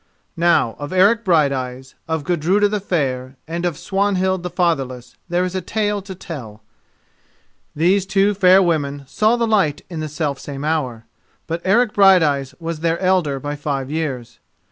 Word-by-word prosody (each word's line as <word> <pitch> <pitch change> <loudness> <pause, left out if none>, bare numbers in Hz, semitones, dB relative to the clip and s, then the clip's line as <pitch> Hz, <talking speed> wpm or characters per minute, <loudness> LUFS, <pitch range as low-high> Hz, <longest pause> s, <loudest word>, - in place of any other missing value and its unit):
Now 165 -9 +2
of 145 0 -6
Eric 200 +5 +4
Brighteyes, 135 - 0
of 160 -2 -2
Gudruda 180 +6 +2
the 210 0 -2
Fair 130 -8 -2
and 170 +2 -2
of 165 -4 -4
Swanhild 190 -2 0
the 180 - -4
Fatherless, 135 -9 -2
there 175 +1 +1
is 180 - -4
a 185 - -2
tale 210 +2 -1
to 190 -1 -9
tell. 115 - -9 1.1
These 185 +5 +2
two 195 +1 +2
fair 190 0 +5
women 145 -5 -1
saw 215 - +2
the 235 -1 0
light 195 -10 +1
in 165 - -5
the 155 0 -4
self 145 -2 -3
same 140 0 -6
hour. 130 -8 -2 0.4
But 165 +1 -4
Eric 215 +4 +3
Brighteyes 155 -9 +4
was 165 -1 -4
their 165 +1 0
elder 180 -7 +1
by 145 +1 -4
five 140 -2 -3
years. 130 -7 -4
165 Hz, 165 wpm, -20 LUFS, 140-190 Hz, 1.1 s, fair